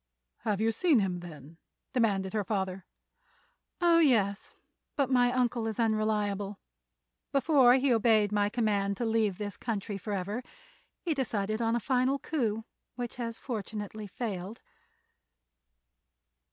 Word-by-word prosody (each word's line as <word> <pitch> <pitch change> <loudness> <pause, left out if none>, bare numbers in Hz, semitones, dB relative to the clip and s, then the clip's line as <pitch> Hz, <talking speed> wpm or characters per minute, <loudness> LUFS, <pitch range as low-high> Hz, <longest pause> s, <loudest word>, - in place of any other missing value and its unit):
"Have 210 -2 -1
you 225 +1 +2
seen 300 +6 +3
him, 190 -4 0
then?" 160 -2 -11 0.4
demanded 200 -7 +1
her 215 -2 0
father. 190 -2 -3 0.9
"Oh, 340 -1 +5
yes; 215 -10 +2 0.4
but 275 -3 +1
my 245 -1 +4
uncle 245 -2 0
is 220 0 -4
unreliable. 210 -3 0 0.7
Before 270 -3 +5
he 265 -1 +3
obeyed 220 -2 +3
my 205 -1 +2
command 205 -3 0
to 240 - -1
leave 220 -4 +1
this 205 -2 -5
country 205 -3 -3
forever 205 +3 -3 0.6
he 335 - 0
decided 220 -5 -1
on 230 0 +1
a - - +1
final 255 +2 +1
coup, 225 -8 -2 0.3
which 245 -1 -5
has 230 -2 -4
fortunately 215 -3 -5
failed." 200 0 -5
220 Hz, 125 wpm, -30 LUFS, 200-245 Hz, 0.9 s, Oh